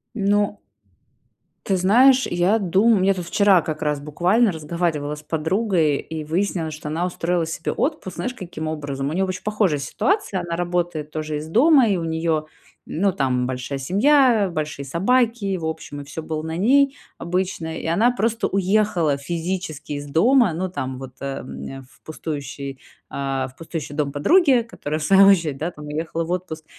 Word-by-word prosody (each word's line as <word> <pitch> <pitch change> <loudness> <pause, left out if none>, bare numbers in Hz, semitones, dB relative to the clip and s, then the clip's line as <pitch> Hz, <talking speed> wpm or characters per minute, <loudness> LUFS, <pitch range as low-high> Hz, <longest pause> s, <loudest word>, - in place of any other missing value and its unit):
Ну 205 -1 +1 1.1
Ты 190 - +1
знаешь, 250 +8 +5
я 175 +5 +2
думаю. 200 +3 +3
Мне 195 +1 +3
тут 180 -2 -5
вчера 195 0 +4
как 155 -1 -5
раз 150 -1 0
буквально 180 +10 +2
разговаривала 155 -2 -2
с 150 - -11
подругой, 160 -1 +1
и 160 +1 -6
выяснилось, 165 0 -1
что 150 0 -8
она 160 +4 -1
устроила 175 -1 -1
себе 160 0 -3
отпуск, 275 - -2
знаешь, 250 - -3
каким 175 -8 -6
образом? 145 -3 -3
У - - -3
неё 190 +3 +1
очень 185 0 -5
похожая 210 -8 +1
ситуация. 265 - -1
Она 170 -1 -4
работает 175 -3 -2
тоже 155 -1 -3
из 150 +1 -6
дома, 260 - +5
и 195 - +2
у 170 - -3
неё, 160 -1 -1 0.4
ну, 195 +5 0
там 130 -7 0
большая 130 +2 -4
семья, 220 - +3
большие 150 -3 -4
собаки, 200 - +1
в 165 - -5
общем, 160 -2 -5
и - - -8
всё 155 +3 -7
было 155 -1 -3
на 160 +1 -4
ней 275 +8 +4 0.2
обычно. 170 -2 -3
И - - -8
она 200 +10 +3
просто 230 -1 0
уехала 190 -6 +1
физически 165 0 -4
из 145 0 -5
дома, 225 - +4
ну, 185 +3 -2
там, 130 -7 -4
вот 130 0 -9
э, 140 0 -4 0.4
в 130 -3 -21
пустующий, 140 -3 -6 0.3
а, 135 -1 -2
в 130 - -16
пустующий 160 -2 -6
дом 145 -2 -1
подруги, 270 - +4
которая, 155 -9 -5
в - - -4
свою 195 +4 +6
очередь, 165 -8 +3
да, 160 +5 -3
там, 150 -2 -11
уехала 160 +2 -3
в 170 - -5
отпуск, 180 -3 -4
170 Hz, 175 wpm, -22 LUFS, 150-200 Hz, 1.1 s, свою